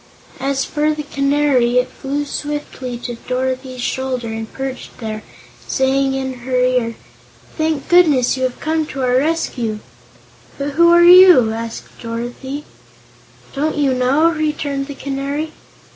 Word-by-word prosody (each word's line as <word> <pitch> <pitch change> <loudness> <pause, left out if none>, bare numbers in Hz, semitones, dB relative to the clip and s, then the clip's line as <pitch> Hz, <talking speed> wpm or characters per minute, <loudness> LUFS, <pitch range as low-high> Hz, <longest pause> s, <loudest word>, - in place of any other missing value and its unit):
As 270 0 -1
for 305 0 0
the 300 - -4
Canary, 275 -4 +2
it 250 0 +3
flew 285 +2 -4
swiftly 290 -4 -5
to 240 0 -6
Dorothy's 255 0 -2
shoulder 255 -2 -2
and 225 0 -5
perched 265 -1 -6
there, 215 -2 -5 0.5
saying 270 0 +1
in 265 -1 -3
her 255 +1 -3
ear: 250 -2 +1 0.6
"Thank 315 -3 -1
goodness 305 -10 +4
you 260 - -5
have 255 -1 -1
come 315 0 -1
to 270 -2 -4
our 250 0 +3
rescue!" 260 -7 -1 0.8
"But 285 +1 -3
who 340 +4 +5
are 345 0 +6
you?" 355 -10 +8
asked 230 0 -7
Dorothy 245 +5 -5 0.9
"Don't 300 +2 -1
you 280 -3 +2
know?" 270 +6 +3
returned 300 -3 -2
the 285 - -7
Canary. 280 +3 -3
270 Hz, 140 wpm, -18 LUFS, 250-295 Hz, 0.9 s, you